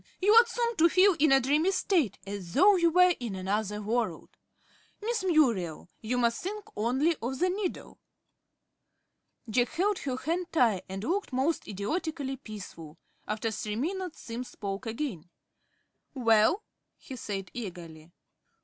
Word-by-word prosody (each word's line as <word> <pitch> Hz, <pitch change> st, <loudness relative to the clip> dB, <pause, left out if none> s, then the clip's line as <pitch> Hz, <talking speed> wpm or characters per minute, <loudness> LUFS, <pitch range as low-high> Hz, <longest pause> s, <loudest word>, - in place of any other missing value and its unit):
You 405 Hz, +3 st, +4 dB
ought 465 Hz, +1 st, +7 dB
soon 470 Hz, -2 st, -1 dB
to 335 Hz, +2 st, +5 dB
feel 375 Hz, +3 st, +5 dB
in 305 Hz, -1 st, +4 dB
a 270 Hz, -, +7 dB
dreamy 295 Hz, +7 st, +2 dB
state, 360 Hz, -, +1 dB
as 195 Hz, -4 st, -7 dB
though 400 Hz, +2 st, +6 dB
you 340 Hz, -2 st, +3 dB
were 360 Hz, +2 st, +5 dB
in 235 Hz, -6 st, -4 dB
another 210 Hz, +2 st, -2 dB
world. 230 Hz, +3 st, -2 dB, 0.7 s
Miss 450 Hz, 0 st, -2 dB
Muriel, 235 Hz, -, +1 dB
you 240 Hz, +3 st, -2 dB
must 235 Hz, -1 st, +1 dB
think 415 Hz, +3 st, -5 dB
only 260 Hz, +10 st, +1 dB
of 255 Hz, +3 st, -3 dB
the 365 Hz, +5 st, +2 dB
needle." 385 Hz, -1 st, -4 dB, 1.5 s
Jack 240 Hz, +2 st, +1 dB
held 390 Hz, +3 st, 0 dB
her 260 Hz, -2 st, -3 dB
hand 335 Hz, +6 st, -2 dB
tight, 230 Hz, -, +2 dB
and 195 Hz, +1 st, -5 dB
looked 380 Hz, -, -1 dB
most 270 Hz, +6 st, 0 dB
idiotically 270 Hz, -, -3 dB
peaceful. 180 Hz, -9 st, -10 dB, 0.3 s
After 215 Hz, +2 st, -2 dB
three 210 Hz, 0 st, -4 dB
minutes 355 Hz, -, -3 dB
Simms 240 Hz, +2 st, -6 dB
spoke 200 Hz, +3 st, -5 dB
again. 225 Hz, -, -4 dB, 0.9 s
"Well?" 230 Hz, -, +3 dB, 0.3 s
he 265 Hz, -, -9 dB
said, 195 Hz, -5 st, -5 dB
eagerly. 170 Hz, -7 st, -8 dB
255 Hz, 145 wpm, -29 LUFS, -, 1.5 s, ought